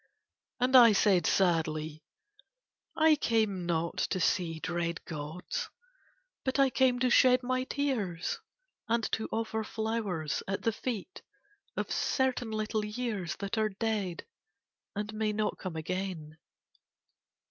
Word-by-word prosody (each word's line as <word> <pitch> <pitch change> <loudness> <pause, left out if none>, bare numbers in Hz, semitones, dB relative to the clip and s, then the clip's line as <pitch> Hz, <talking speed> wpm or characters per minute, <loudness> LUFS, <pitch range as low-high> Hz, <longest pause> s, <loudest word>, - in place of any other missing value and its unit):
And 255 +1 +2
I 235 -3 +9
said 195 -4 +3
sadly: 155 -4 +1 1.0
"I 315 -1 +6
came 215 -9 0
not 170 0 -1
to 185 - 0
see 165 -2 +1
dread 170 0 -2
gods, 180 - -5 0.7
but 260 +1 0
I 275 -1 +4
came 255 -1 +3
to 250 -1 +3
shed 255 0 +6
my 255 +1 0
tears 230 -13 -2 0.5
and 230 0 +2
to 220 - -1
offer 220 0 -1
flowers 215 -9 -2
at 195 0 -2
the 225 - +2
feet 235 - -5 0.6
of - - -2
certain 260 -3 0
little 215 0 -1
years 210 -5 -3
that 200 +2 -3
are 215 0 +2
dead 205 -3 -2 0.7
and 210 +1 -3
may 215 0 0
not 215 0 -1
come 185 -4 -5
again." 160 -2 -4
210 Hz, 125 wpm, -30 LUFS, 175-240 Hz, 1.0 s, I